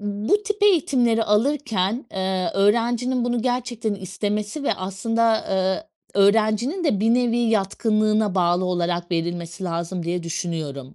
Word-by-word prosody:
bu 205 - 0
tip 420 -1 -4
eğitimleri 255 - +3
alırken, 225 -1 0
eee, 190 -2 -1
öğrencinin 235 +5 +1
bunu 240 -1 -1
gerçekten 240 -4 -2
istemesi 205 - -3
ve - - +1
aslında, 220 +4 0
ııı, 190 +8 0 0.4
öğrencinin 225 - +1
de 210 -10 +1
bir 225 +2 +3
nevi 240 -1 +1
yatkınlığına 215 -1 +1
bağlı 175 0 +2
olarak 175 -1 -1
verilmesi 170 +2 -3
lazım 170 +1 -3
diye 175 +1 -2
düşünüyorum. 155 -5 -5
210 Hz, 125 wpm, -22 LUFS, 185-240 Hz, 0.4 s, eğitimleri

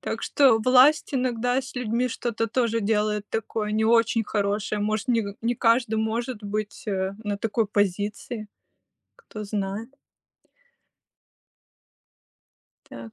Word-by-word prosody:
Так - - -4
что 260 -6 +4
власть 260 +7 +5
иногда 250 0 0
с 265 +1 -10
людьми 250 +1 -1
что-то 230 -1 -2
тоже 230 -1 0
делает 210 0 0
такое 215 -1 -3
не 220 +1 +1
очень 230 0 +3
хорошее. 205 0 -1
Может, 215 +2 -1
не 230 -3 +2 0.2
не 240 +1 +1
каждый 230 -1 +2
может 225 +1 -2
быть, 210 +4 -4
э, 190 -1 -1
на 205 -1 -1
такой 220 +1 0
позиции, 205 +3 -2 0.7
кто 335 - -9
знает. 205 +2 -4 3.0
Так. 225 - -10
220 Hz, 120 wpm, -25 LUFS, 210-240 Hz, 3.0 s, власть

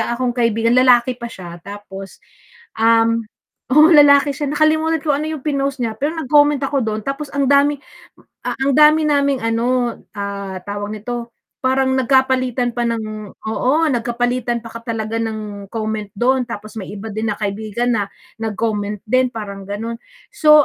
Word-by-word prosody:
akong 245 +1 -1
kaibigan, 230 -1 +1
lalaki 250 0 +5
pa 235 - -4
siya, 175 -5 -10
tapos, 195 0 -9 0.6
um 230 0 +4 0.5
oo, 305 +3 +8
lalaki 285 -1 +6
siya. 285 +1 -3
Nakalimutan 315 +2 +2
kung 295 - +2
ano 310 - -2
'yong 310 -3 -5
pinost 275 -2 -1
niya. 225 - -2
Pero 295 +4 0
nag-comment 290 -1 +4
ako 275 0 0
do'n, 215 0 -2
tapos 275 +1 -4
ang 280 - +2
dami 285 +1 +4
m - - -32 0.6
a - - 0
ang 270 +1 +1
dami 305 +1 +6
naming 280 -2 +2
ano, 240 +1 0 0.2
ah, 200 -1 -4
tawag 205 +1 -4
nito, 235 +2 -5 0.3
parang 260 0 +2
nagkapalitan 260 -2 +2
pa 240 - 0
ng 215 -2 -4
oo, 220 +4 -1 0.2
nagkapalitan 240 0 -1
pa - - -7
ka 230 - -7
talaga 220 0 -3
ng 215 -2 -5
comment 215 -2 -3
do'n. 250 +4 +2
Tapos 215 -2 -8
may 195 -1 -7
iba 210 +2 -7
din 220 +1 -2
na - - -6
kaibigan 215 +4 -1
na 205 - +1 0.4
nag-comment 210 -1 -2
din, 255 +1 +3
parang 200 -3 -7
gano'n. 225 +3 -4 0.4
So 300 -1 +6
235 Hz, 165 wpm, -19 LUFS, 215-275 Hz, 0.6 s, oo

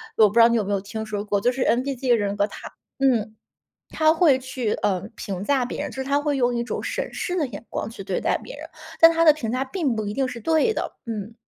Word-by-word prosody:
我 220 - +6
不 - - -10
知 235 - +4
道 230 - +9
你 235 - +1
有 220 - +1
没 200 - -4
有 200 - +1
听 220 +2 -6
说 205 -1 -4
过， 205 -1 0
就 245 - +3
是 255 +1 -5
NPD 260 +1 0
的 240 - +6
人 200 -1 -1
格， 205 - +2
他 - - -10 0.3
嗯， 230 -5 +1 0.5
他 315 0 +3
会 320 -5 +4
去， 255 -4 -3
呃， 185 -3 -1
评 195 -1 -5
价 270 +1 +2
别 245 - -5
人， - - -4
就 - - -11
是 265 - -3
他 280 +2 +1
会 290 -1 -1
用 245 -1 +1
一 235 - 0
种 - - -4
审 - - -3
视 360 -1 -3
的 305 - +1
眼 230 -3 -9
光 - - -3
去 225 -3 -9
对 190 -2 -2
待 - - +1
别 - - -10
人， - - -9 0.3
但 330 - +9
他 330 0 +2
的 310 - +8
评 260 -7 -4
价 255 +2 0
并 280 -3 -1
不 215 - -2
一 205 - -3
定 270 +3 0
是 245 -2 -7
对 320 - +2
的。 - - -4
嗯。 220 -1 -5
245 Hz, 310 characters per minute, -23 LUFS, 210-275 Hz, 0.5 s, 道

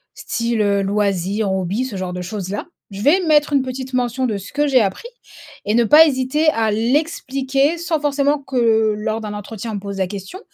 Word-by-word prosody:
style, 235 -1 -2
heu, 200 -1 +2
loisir, 200 0 0
hobby 190 +6 -1
ce 245 -6 -6
genre 185 -1 -4
de 180 - -5
choses 190 +1 -5
là. 205 - -4 0.2
Je 195 0 -7
vais 305 - +4
mettre 300 -2 +3
une 275 -2 +3
petite 260 0 -6
mention 250 +1 0
de 215 -4 -2
ce 195 - -10
que 295 +1 +1
j'ai 260 -4 +4
appris 195 - -2 0.6
et 210 - 0
ne 235 +1 +4
pas 305 +7 +8
hésiter 280 +2 0
à 225 -7 +1
l'expliquer. 270 +4 0
Sans 335 -2 -1
forcément 285 0 +1
que, 225 -5 +1
lors 215 +1 -2
d'un 210 -1 -5
entretien, 210 +2 -6
on - - -4
me - - -3
pose 200 0 -6
la 190 - +1
question, 200 - -8
230 Hz, 210 wpm, -19 LUFS, 205-275 Hz, 0.6 s, pas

